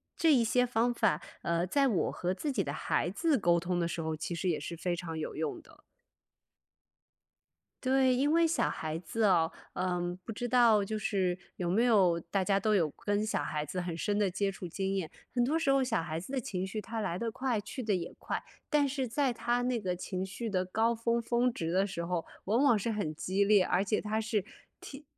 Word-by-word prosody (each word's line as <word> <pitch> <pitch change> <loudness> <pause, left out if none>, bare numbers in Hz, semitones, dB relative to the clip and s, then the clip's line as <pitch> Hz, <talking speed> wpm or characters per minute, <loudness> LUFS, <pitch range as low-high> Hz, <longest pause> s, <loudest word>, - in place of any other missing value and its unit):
这 325 -2 +4
一 245 -4 +4
些 250 +2 +3
方 240 0 +1
法， 225 -4 +2 0.2
呃， 170 +1 0
在 275 +7 +3
我 205 -8 +1
和 180 +1 -2
自 290 +9 -3
己 265 - 0
的 - - -3
孩 - - 0
子 320 -5 +1
沟 170 -3 +3
通 175 +1 -1
的 170 - +1
时 170 - -3
候， 160 0 -2
其 160 +3 -4
实 185 +2 -1
也 160 - 0
是 170 +3 -6
非 175 +1 -1
常 165 -2 -5
有 155 - -4
用 155 -1 -2
的。 - - -19 2.1
对， 260 0 +4
因 275 +4 +2
为 335 0 +5
小 330 - +1
孩 160 0 -3
子 220 +6 -2
哦， 170 -5 +4 0.2
嗯， 180 -1 -1
不 225 - -6
知 240 +3 -3
道 230 -4 +5
就 215 +2 -3
是 190 -4 0 0.2
有 175 - -3
没 195 +7 +3
有 195 -8 +4
大 185 +3 -1
家 195 0 +2
都 215 +1 +2
有 170 -6 +3
跟 205 +5 -1
小 215 - 0
孩 150 0 -2
子 180 +5 -3
很 175 -2 -4
深 205 +4 0
的 205 -2 +2
接 200 +2 -1
触 190 -2 -7
经 195 +3 -2
验， 170 -5 -3 0.2
很 245 -1 +2
多 295 +6 +1
时 305 -4 +2
候 275 -1 +4
小 255 - 0
孩 160 0 -3
子 185 +10 -9
的 270 - 0
情 190 -6 -3
绪 205 +3 -4
它 225 +2 -5
来 175 -4 -2
得 230 +3 -2
快 255 -3 -1
去 255 +5 -6
得 215 -4 +1
也 170 -2 -4
快。 - - -3 0.3
但 295 -2 +3
是 265 -1 -2
在 260 +2 +1
他 240 +1 0
那 245 -3 0
个 180 -2 -1
情 185 +1 -4
绪 195 +5 -5
的 185 -4 0
高 220 +5 +1
峰 230 +1 0
峰 240 +2 +1
值 165 -7 -3
的 190 +2 +2
时 170 -3 -4
候， 170 -1 -1 0.2
往 225 +6 +2
往 240 -6 +5
是 225 +3 -1
很 160 -8 -2
激 190 +5 0
烈， 200 -2 +5
而 180 +2 +2
且 210 +1 0
它 215 +1 -1
是 215 -3 -1 0.3
听 275 +1 -10
205 Hz, 250 characters per minute, -31 LUFS, 180-240 Hz, 2.1 s, 为